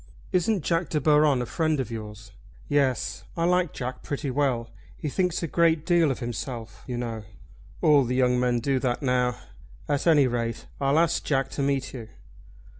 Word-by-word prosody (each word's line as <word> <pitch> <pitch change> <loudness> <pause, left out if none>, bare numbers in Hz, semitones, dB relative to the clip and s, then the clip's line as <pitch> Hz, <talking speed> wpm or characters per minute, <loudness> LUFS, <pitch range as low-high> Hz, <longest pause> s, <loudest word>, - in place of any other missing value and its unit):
"Isn't 185 0 +1
Jack 165 -1 0
De 155 - 0
Baron 150 -3 +4
a - - -4
friend 155 +2 0
of 125 -4 -3
yours?" 105 -1 -8 0.4
"Yes, 140 -5 0
I 165 - 0
like 180 -2 +2
Jack 125 0 -5
pretty 140 -1 -3
well. 125 -4 0 0.3
He 150 - -3
thinks 180 +2 0
a - - 0
great 165 -1 +2
deal 170 -3 +4
of 135 - -1
himself, 115 -1 -6
you 125 -2 -3
know." 115 -2 -4 0.6
"All 145 -3 +6
the 125 +1 -2
young 125 -1 +3
men 125 -1 +1
do 135 +1 +1
that 125 +1 -1
now. 125 -2 +1 0.5
At 145 +3 0
any 150 -4 +6
rate 115 -2 -2
I'll 140 +2 +2
ask 165 0 +2
Jack 135 -2 0
to - - -3
meet 140 -1 -1
you." 115 -4 -8
135 Hz, 185 wpm, -26 LUFS, 120-155 Hz, 0.6 s, All